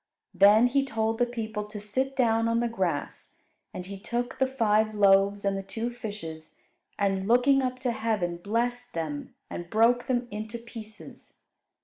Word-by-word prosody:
Then 210 +4 +6
He 270 +3 +2
told 225 -3 -1
the 245 - +3
people 220 -3 -4
to 210 0 -8
sit 260 +7 -2
down 230 -3 +2
on 230 0 +2
the 240 - +1
grass; 185 -9 -3 0.4
and 180 - -7
He 195 +1 -8
took 240 +3 -3
the 265 - +3
five 220 -4 +1
loaves 200 0 +4
and 195 0 +1
the 195 - -2
two 225 +5 -4
fishes, 165 -10 -8 0.4
and, 195 -1 0
looking 250 +4 +4
up 255 -1 -2
to 255 -2 0
heaven, 215 -7 -1
blessed 240 +6 -2
them 155 -3 -4
and 175 0 -7
broke 235 +4 +3
them 245 -1 0
into 215 +2 -5
pieces. 225 -2 -11
220 Hz, 165 wpm, -27 LUFS, 200-240 Hz, 0.4 s, Then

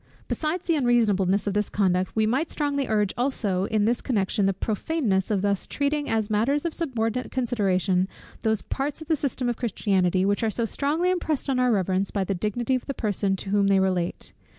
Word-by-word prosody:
Besides 325 +3 -2
the 335 - +1
unreasonableness 210 -7 +2
of 200 - -1
this 210 0 0
conduct, 185 -2 0
we 220 -1 +3
might 265 +9 0
strongly 285 -2 -1
urge 210 -2 +1
also 210 -7 0
in 215 0 +1
this 235 +2 +1
connection 200 -4 0
the - - +3
prophaneness 210 - -1
of 200 -3 0
thus 200 -1 0
treating 290 +1 -1
as 220 -2 +1
matters 235 +9 +1
of 335 - -1
subordinate 250 -6 -2
consideration 195 -7 +1 0.3
those 220 -2 0
parts 285 +3 -3
of - - -18
the 320 - +3
system 270 -3 -2
of 240 -1 -1
Christianity, 190 -5 +1
which 205 +1 +1
are 225 - +1
so 230 +2 -1
strongly 305 - +1
impressed 315 -6 -1
on 255 - +1
our 250 -1 +3
reverence 190 -1 +1
by 200 - -1
the 195 - -1
dignity 215 +7 -1
of 255 - -1
the 275 - -3
person 200 -3 0
to 195 +1 -5
whom 200 -1 +3
they 195 -1 +4
relate. 185 -2 -1
220 Hz, 200 wpm, -25 LUFS, 195-270 Hz, 0.3 s, they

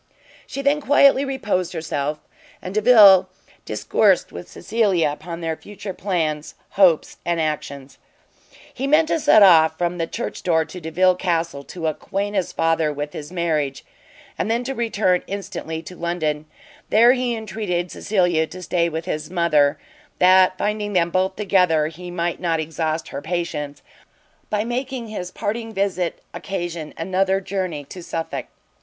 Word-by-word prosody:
She 275 - -5
then 290 +2 +2
quietly 280 -1 +5
reposed 210 -11 -2
herself, 150 -3 -2 0.4
and 185 - -7
Delvile 205 -4 +7 0.4
discoursed - - +2
with - - -9
Cecilia 190 -9 +1
upon 165 +3 -7
their 165 -1 -2
future 205 +2 -8
plans, 160 -6 -2 0.2
hopes 180 -5 +3
and 170 -1 -1
actions. 140 -3 -4 0.7
He 270 +2 -3
meant 310 +3 +4
to 325 - +1
set 215 -7 +6
off 160 -4 +6
from 175 0 -2
the 165 - -1
church 235 - -5
door 160 -3 +2
to 180 - -10
Delvile 180 +4 +3
Castle, 170 -5 -2
to 170 -3 -7
acquaint 200 +6 -2
his 190 -3 0
father 165 -1 +1
with 145 0 -5
his 150 +2 -8
marriage, 155 -6 -1 0.5
and 210 - -1
then 235 +2 0
to 270 +2 -3
return 215 -7 +1
instantly 165 -4 -5
to 180 - -10
London: 155 -3 -2 0.4
there 235 +3 +6
he 250 -2 -1
entreated 210 -6 -3
Cecilia 175 -6 +1
to 185 +2 -10
stay 170 -1 +1
with 160 0 -5
his 155 +2 -4
mother, 155 -5 +2 0.4
that, 185 0 +5
finding 210 0 -2
them 170 -2 +2
both 190 +1 0
together, 180 -7 +2
he 175 +2 -10
might 175 -1 -2
not 165 -2 0
exhaust 160 0 -3
her 140 - -6
patience, 150 -3 -4 0.7
by 210 0 0
making 245 0 -4
his 180 -4 -5
parting 225 +4 -4
visit 195 -4 -2
occasion 175 -5 -5
another 190 +3 +1
journey 185 -6 -3
to 180 +6 -10
Suffolk. 165 -1 -5
180 Hz, 150 wpm, -22 LUFS, 160-205 Hz, 0.7 s, Delvile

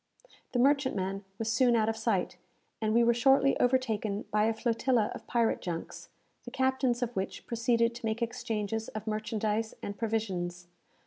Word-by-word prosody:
The - - +1
merchantman 240 -8 +1
was 225 0 -1
soon 240 0 +4
out 220 -1 +2
of 225 - 0
sight, 220 - 0 0.5
and 215 -1 +1
we 235 +2 +4
were 235 0 +4
shortly 270 +3 +4
overtaken 225 -5 +1
by 210 0 +3
a 225 - +2
flotilla 230 0 +1
of - - -10
pirate 235 -2 +1
junks, 170 -2 -6 0.3
the - - -8
captains 260 -2 +1
of 240 0 -4
which 190 0 -4
proceeded 235 0 +1
to 235 -1 -7
make 220 +1 -1
exchanges 225 -2 -3
of 215 - -6
merchandise 215 0 -2
and 200 - -4
provisions. 185 -6 -3
225 Hz, 165 wpm, -30 LUFS, 215-240 Hz, 0.5 s, soon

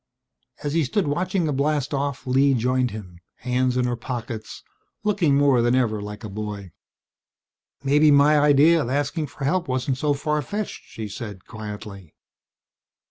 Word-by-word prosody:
As 145 -1 -2
he 165 -1 +2
stood 175 +8 0
watching 180 +4 0
the 150 - 0
blastoff 140 -1 -1
Lee 135 +2 +3
joined 125 +1 +1
him, 90 -6 -9 0.2
hands 125 0 0
in 125 - +2
her 120 0 0
pockets, 120 -2 -6 0.4
looking 190 -9 +2
more 140 -4 +4
than 120 +1 +2
ever 110 -5 +1
like 105 +2 -8
a - - -4
boy. 100 -2 -6 1.1
"Maybe 150 +2 +4
my 145 +1 +5
idea 150 +3 +5
of 120 - -3
asking 145 +3 -1
for 140 - -9
help 175 +5 0
wasn't 130 0 -1
so 145 0 +1
far 150 +1 -1
fetched," 205 +9 -5
she 110 -1 -7
said 105 -3 -8
quietly. 105 -5 -9
130 Hz, 155 wpm, -23 LUFS, 115-150 Hz, 1.1 s, my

